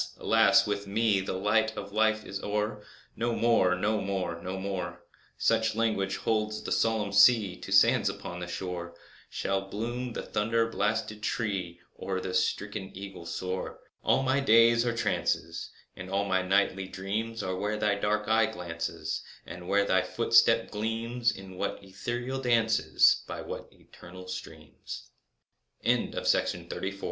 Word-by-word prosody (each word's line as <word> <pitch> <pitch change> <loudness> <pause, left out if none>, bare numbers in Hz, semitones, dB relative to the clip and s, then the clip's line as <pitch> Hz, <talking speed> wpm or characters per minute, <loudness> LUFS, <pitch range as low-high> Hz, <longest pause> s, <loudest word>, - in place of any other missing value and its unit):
alas! - - +4
with 100 -1 -3
me 105 0 +2
The 95 0 -3
light 110 +3 +1
of 100 0 -6
Life 110 0 +2
is 100 0 -5
o'er! 105 0 -2 0.3
No 115 0 -1
more—no 105 -2 +2
more—no 95 -1 -3
more— 90 -3 -4 0.3
(Such 110 -1 +2
language 105 -4 0
holds 110 -1 -1
the - - -5
solemn 110 -3 +1
sea 100 -2 +6
To - - -10
the - - +6
sands - - +4
upon 90 - -6
the 90 - -5
shore) 90 -1 -5 0.3
Shall 95 0 -1
bloom 115 +5 -4
the - - -4
thunder 115 +2 +1
blasted 105 0 -1
tree, 95 -7 -2
Or 95 -1 -3
the 95 0 -4
stricken 95 +2 -1
eagle 95 -3 -8
soar! 95 +1 -3
And - - -20 0.2
all 135 - +2
my 130 +1 +2
days 115 -2 +5
are 115 -1 -1
trances, 85 -7 -1 0.3
And 90 0 -8
all 100 +1 0
my 95 -1 +1
nightly 95 0 +1
dreams 110 +5 -3
Are 95 0 -2
where 105 +3 -2
thy 105 -1 +2
dark 105 +1 0
eye 110 0 +4
glances, 90 -6 -4 0.2
And 90 0 -9
where 100 +1 +3
thy 95 -1 +3
footstep - - +3
gleams— 115 +2 -1
In 95 -3 -10
what 100 - -2
ethereal 120 +7 -4
dances, 115 -3 +3
By - - -5
what - - -7
eternal 90 +1 -13
streams. 75 -8 -8 0.7
1835. - - 0 0.2
THE 100 - -10
COLISEU - - -16
100 Hz, 155 wpm, -29 LUFS, 95-110 Hz, 0.7 s, sea